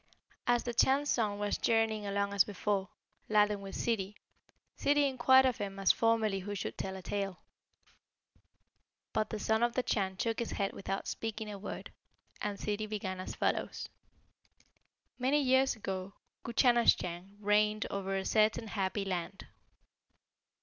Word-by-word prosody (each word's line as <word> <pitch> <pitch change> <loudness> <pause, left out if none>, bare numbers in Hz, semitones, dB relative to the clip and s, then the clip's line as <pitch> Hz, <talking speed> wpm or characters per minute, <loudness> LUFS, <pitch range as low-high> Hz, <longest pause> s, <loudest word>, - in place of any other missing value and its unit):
As 240 -1 +3
the 240 - -3
Chan's 275 +5 +3
Son 210 -4 +1
was 205 0 -1
journeying 220 -2 +1
along 200 0 -1
as 200 -2 +5
before, 200 -1 -2 0.4
laden 210 -1 +3
with 195 -1 -7
Ssidi, 210 -4 -1 0.6
Ssidi 290 0 +3
inquired 260 0 +5
of 255 -2 +1
him 195 -1 -4
as 195 -1 +5
formerly 225 -3 +2
who 205 +2 -5
should 195 - -4
tell 190 0 -4
a 190 - -8
tale. 195 0 -3 1.8
But 215 0 0
the 220 - -3
Son 220 +1 +1
of 240 0 +2
the 255 - +1
Chan 190 -5 -1
shook 225 +2 -1
his 235 - -3
head 200 -1 -1
without 195 0 -4
speaking 220 -1 -4
a 200 - -7
word, 195 - -7 0.5
and 205 -1 -2
Ssidi 210 +1 -2
began 190 -3 -3
as 185 - -5
follows: - - -1 1.3
"Many 265 +4 +3
years 265 -1 +3
ago 195 -3 -5 0.3
Guchanasschang 205 -6 +2
reigned 210 +1 +2
over 195 -1 -2
a 190 - -3
certain 215 0 +2
happy 195 0 -1
land. 185 0 -4
210 Hz, 150 wpm, -32 LUFS, 195-230 Hz, 1.8 s, as